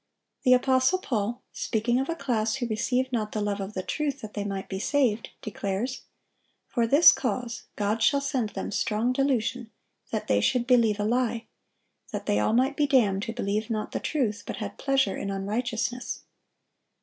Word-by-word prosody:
The 255 - +5
apostle 260 +6 +3
Paul, 235 - -2
speaking 235 +3 0
of 270 - -2
a 335 - 0
class 235 -7 0
who 265 -2 -2
"received 250 +4 0
not 215 -3 -1
the 215 - -1
love 205 -1 -1
of 195 +2 -5
the 185 - -2
truth, 285 +2 -2
that 215 -1 -8
they 205 - -2
might 195 -1 -4
be 190 - -4
saved," 235 -2 +1
declares, 215 +4 -3 0.6
"For 235 -3 0
this 290 +8 +8
cause 245 -1 -3
God 210 +2 0
shall 280 +5 +4
send 270 -5 -1
them - - -5
strong 215 +5 0
delusion, 255 -3 0 0.4
that 220 - -2
they 100 0 +3
should 240 - +2
believe 230 -4 +4
a - - +1
lie: 235 0 0 0.7
that - - -4
they 105 - +2
all 105 - +2
might 260 +4 +2
be 290 0 +2
damned 210 -8 +3
who 225 - -4
believed 215 0 -2
not 215 -2 -2
the - - -2
truth, 230 -8 -1
but - - -3
had - - -6
pleasure 270 -6 +2
in 200 - -4
unrighteousness." 225 +5 -2
235 Hz, 185 wpm, -27 LUFS, 210-260 Hz, 0.7 s, this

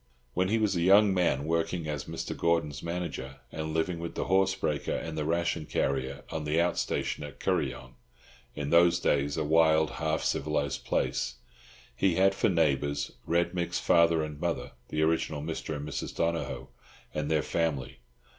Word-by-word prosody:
When 95 +1 +1
he 110 - +2
was 105 -3 +1
a 85 - 0
young 100 +3 +6
man 85 -6 +1
working 85 0 -1
as 75 -2 -3
Mr. - - -5
Gordon's 80 -4 0
manager, 85 -6 -4 0.2
and 80 0 -4
living 80 +2 -1
with 85 0 -5
the - - -1
horse 95 +1 +3
breaker 75 -6 -1
and 80 -1 -4
the 75 -1 -2
ration 85 -1 0
carrier 65 -1 -1
on 80 - -3
the 75 +2 +1
out 85 0 +1
station - - -2
at 75 -2 -9
Kuryong 65 0 -1 0.6
(in 70 0 -3
those 85 0 +5
days 70 0 +1
a 80 - +1
wild, 80 0 +4
half 80 0 -1
civilised 70 -1 -1
place), - - 0 0.6
he 95 +3 +2
had 95 +2 +4
for - - +2
neighbours 70 -4 +1 0.2
Red 85 +1 +1
Mick's 90 -1 -1
father 85 -1 +4
and 75 -1 -6
mother, 85 +1 -2 0.2
the 75 0 0
original 80 -2 0
Mr. 80 -1 -4
and 75 +1 -5
Mrs. 75 - -4
Donohoe, 85 -4 -2 0.4
and 75 -1 -2
their 80 -1 +2
family. 80 -6 -2
80 Hz, 175 wpm, -29 LUFS, 75-85 Hz, 0.6 s, young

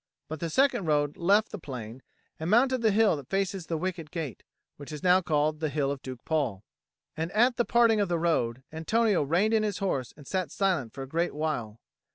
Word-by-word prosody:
But 155 0 -6
the 170 - -3
second 265 - +2
road 145 -1 +1
left 200 +5 +2
the 210 - -6
plain, 125 -5 -8 0.4
and 160 +2 -3
mounted 255 +4 +3
the 225 - +4
hill 215 -2 +4
that 140 -3 -10
faces 195 -2 -1
the 165 - -1
wicket 170 -2 -4
gate, 155 -7 -5 0.4
which 145 +1 -9
is 150 -1 -7
now 185 +1 +5
called 155 -2 0
the 155 -1 -1
Hill 140 -1 0
of 140 -1 -5
Duke 130 -2 -9
Paul. 135 -11 -1 0.5
And 165 +2 -3
at 240 +4 +4
the 240 - +2
parting 230 -2 +4
of 200 -3 +1
the 170 - +1
road, 130 -7 0
Antonio 210 +5 +1
reined 175 +10 +2
in 220 - +4
his 210 -3 -1
horse 135 - -2
and 145 - -13
sat 185 -2 -2
silent 175 - 0
for 135 - -7
a - - -8
great 170 +4 -1
while. 120 -8 -3
165 Hz, 215 wpm, -28 LUFS, 145-200 Hz, 0.5 s, now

